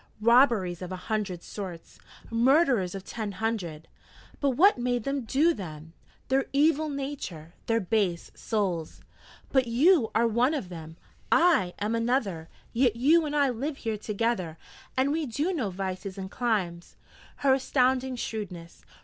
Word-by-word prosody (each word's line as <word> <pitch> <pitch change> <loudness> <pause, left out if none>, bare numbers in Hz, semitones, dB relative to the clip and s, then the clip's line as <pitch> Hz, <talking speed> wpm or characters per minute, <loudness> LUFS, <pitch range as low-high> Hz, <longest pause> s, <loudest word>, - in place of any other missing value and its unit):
'Robberies 225 -6 +4
of 180 0 -6
a - - -3
hundred 185 -2 -3
sorts, 185 -5 -8 0.3
murders 240 - +3
of 195 - -6
ten 210 0 -5
hundred 180 -8 -3 0.3
' - - -23
'But 285 - +3
what 390 -5 +6
made 245 -1 0
them 275 -1 -2
do 300 +9 +3
them?' 160 - -8 0.3
'Their 265 +1 +2
evil 310 +2 +3
nature 270 - -6
their 230 0 +2
base 195 -4 -1
souls.' 185 -7 -2 0.5
'But 260 -2 +3
you 260 +1 +4
are 230 +1 +4
one 240 +7 +2
of 210 -11 -4
them, 160 -2 -9 0.3
I 310 - +4
am 210 +2 -1
another: 230 -8 -1 0.2
yet 240 -2 +3
you 305 +7 +4
and 295 - -3
I 285 -2 +3
live 275 +5 -4
here 225 -2 -3
together, 210 -5 -2 0.4
and 265 +2 +2
we 310 -1 -1
do 295 +10 -1
no 255 - -1
vices 190 +1 -5
and 190 0 -6
climes.' 190 -8 -2 0.5
Her 270 - +6
astounding 260 -1 +1
shrewdness! 185 -8 -6
230 Hz, 150 wpm, -27 LUFS, 185-270 Hz, 0.5 s, what